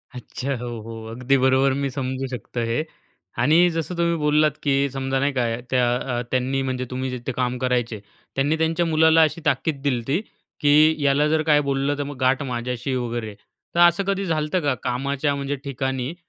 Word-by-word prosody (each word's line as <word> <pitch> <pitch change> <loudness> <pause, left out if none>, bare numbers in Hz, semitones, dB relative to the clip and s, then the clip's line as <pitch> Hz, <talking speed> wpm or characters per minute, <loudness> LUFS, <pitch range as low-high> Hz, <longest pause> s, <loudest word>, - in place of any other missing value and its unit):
अच्छा, 130 +2 -4
हो 120 +1 -6
हो. 115 0 -8
अगदी 130 +3 +1
बरोबर 130 +1 +3
मी 140 -1 -1
समजू 130 0 -3
शकतो 125 -1 -6
हे. 115 +6 0 0.5
आणि 160 +8 +4
जसं 165 +1 -3
तुम्ही 170 0 +1
बोललात, 150 0 +3
की 140 -1 +2
समजा 135 0 -2
नाही 140 +2 +1
का 125 -2 +1 0.3
त्या 125 -1 +2
अ, 125 -1 -2
त्यांनी 130 +1 0
म्हणजे 130 -1 -2
तुम्ही 130 +1 -3
जिथे 125 +1 -4
काम 125 0 -1
करायचे. 120 -4 -1 0.4
त्यांनी 145 +4 +1
त्यांच्या 160 +2 +1
मुलाला 160 0 +5
अशी 155 +1 +1
ताकीद 140 0 0
दिली 140 -3 +1
होती, 135 +8 -1 0.4
की 150 +2 +5
याला 140 +2 +3
जर 155 0 +2
काही 150 - +6
बोललं 140 0 -1
तर 145 - -1
मग 145 -1 -7
गाठ 130 +1 +3
माझ्याशी 125 0 -4
आहे 130 - 0
वगैरे. 120 -4 -4 0.4
तर - - +1
असं 175 +3 +1
कधी 195 0 0
झाल 160 -4 0
होतं 155 +5 0
का, 145 -3 +1
कामाच्या 140 +3 -1
म्हणजे 140 0 -2
ठिकाणी, 135 +1 -3
135 Hz, 190 wpm, -23 LUFS, 125-150 Hz, 0.5 s, काही